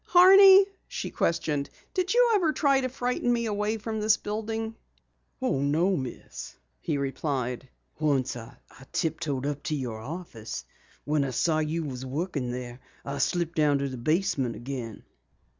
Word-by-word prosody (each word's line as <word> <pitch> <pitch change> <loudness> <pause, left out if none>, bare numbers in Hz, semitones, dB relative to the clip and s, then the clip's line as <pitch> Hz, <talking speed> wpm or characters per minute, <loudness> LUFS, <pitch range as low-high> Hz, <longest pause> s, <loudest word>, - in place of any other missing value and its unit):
"Horney," 385 +2 +9 0.2
she - - -5
questioned, 150 -4 0 0.2
"did 370 0 0
you 485 0 +5
ever 360 -7 +3
try 275 -3 +3
to 255 - -1
frighten 245 -1 -1
me 235 -1 +1
away 210 0 -1
from 220 +1 -4
this 215 0 +4
building?" 220 +1 -3 0.7
"Oh, 255 - 0
no, 160 +7 +2
Miss," 130 -6 -6 0.2
he 155 -4 -2
replied. 135 -2 -2 0.3
"Once 140 -5 +1
I 115 -2 -10 0.3
tiptoed 150 -4 -1
up 145 0 -2
to 155 - -1
your 120 -6 -4
office. 115 - -7 0.4
When 150 -1 +1
I 135 - -1
saw 155 +5 +1
you 155 +2 -1
were 135 -4 -5
working 145 -2 -2
there, 125 0 -6 0.3
I 140 0 -4
slipped 170 -1 0
down 150 -3 +3
to 140 0 -2
the 130 - -6
basement 145 -3 0
again." 120 -4 -6
155 Hz, 155 wpm, -27 LUFS, 135-220 Hz, 0.7 s, Horney